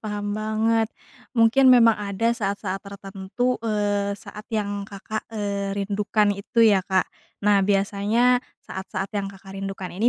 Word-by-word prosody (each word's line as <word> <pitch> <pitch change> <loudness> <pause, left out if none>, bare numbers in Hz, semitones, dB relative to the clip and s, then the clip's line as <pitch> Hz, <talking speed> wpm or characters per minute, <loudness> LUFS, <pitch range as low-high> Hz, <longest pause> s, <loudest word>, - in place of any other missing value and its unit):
paham 205 -1 -3
banget. 220 +1 +1 0.5
Mungkin 245 +4 +5
memang 235 -3 +7
ada 210 +3 -1
saat-saat 200 -3 -3
tertentu, 200 +5 -3
eee, 205 -2 0
saat 210 +1 -11
yang 205 -2 -2
Kakak, 210 +2 -6
eee, 200 -2 -3
rindukan 205 +1 +1
itu 215 +3 +1
ya, 200 -3 +5
Kak. 190 -1 +3 0.4
Nah 205 -1 +5
biasanya 205 +5 +2 0.2
saat-saat 190 +1 -5
yang 200 -1 -2
Kakak 195 0 -12
rindukan 195 -1 -5
ini 215 +7 +2
205 Hz, 135 wpm, -24 LUFS, 200-220 Hz, 0.5 s, memang